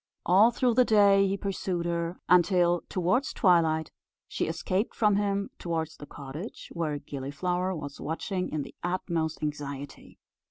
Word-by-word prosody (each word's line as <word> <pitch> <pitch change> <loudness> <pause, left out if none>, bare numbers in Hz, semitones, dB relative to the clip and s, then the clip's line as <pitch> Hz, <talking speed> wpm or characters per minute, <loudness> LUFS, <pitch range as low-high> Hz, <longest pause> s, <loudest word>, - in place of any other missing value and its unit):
All 195 +6 +6
through 245 0 +1
the 250 +2 +5
day 200 -3 +5
he 195 +1 -1
pursued 190 -3 -3
her; 170 0 -2
until, 175 -1 +4
towards 185 +10 0
twilight, 160 -4 +3 0.4
she - - -2
escaped 190 +5 -1
from 210 -3 +3
him 200 -1 -1
towards 160 -2 -3
the 145 - -10
cottage, 145 - -8
where 155 -3 -2
Gilliflower 150 +7 -3
was 145 -3 -7
watching 180 +4 -3
in 150 -2 -2
the - - -11
utmost 170 -3 -2
anxiety. 145 -2 -6
175 Hz, 145 wpm, -28 LUFS, 155-195 Hz, 0.4 s, All